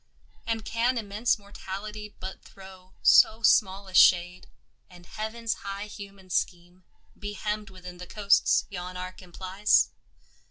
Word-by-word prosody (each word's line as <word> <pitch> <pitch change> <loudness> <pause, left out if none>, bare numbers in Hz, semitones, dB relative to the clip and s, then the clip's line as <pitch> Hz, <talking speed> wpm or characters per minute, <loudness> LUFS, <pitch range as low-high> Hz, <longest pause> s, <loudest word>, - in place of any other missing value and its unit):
And 225 -1 -2
can 240 +2 0
immense 215 +2 0
Mortality 205 +1 -8
but 190 +1 -7
throw 190 -1 -15
So 225 +1 +6
small 195 -3 +3
a 190 - -12
shade, 180 0 +5 0.4
and 175 -1 -15
Heaven's 220 +3 -3
high 200 +1 -5
human 200 -3 -11
scheme 175 +1 -2 0.4
Be 205 0 -5
hemmed 210 0 -3
within 180 -2 -11
the 180 - -8
coasts 200 0 +3
yon 180 -1 -6
arc 185 +1 -7
implies? 190 +3 +1
195 Hz, 130 wpm, -27 LUFS, 185-210 Hz, 0.4 s, So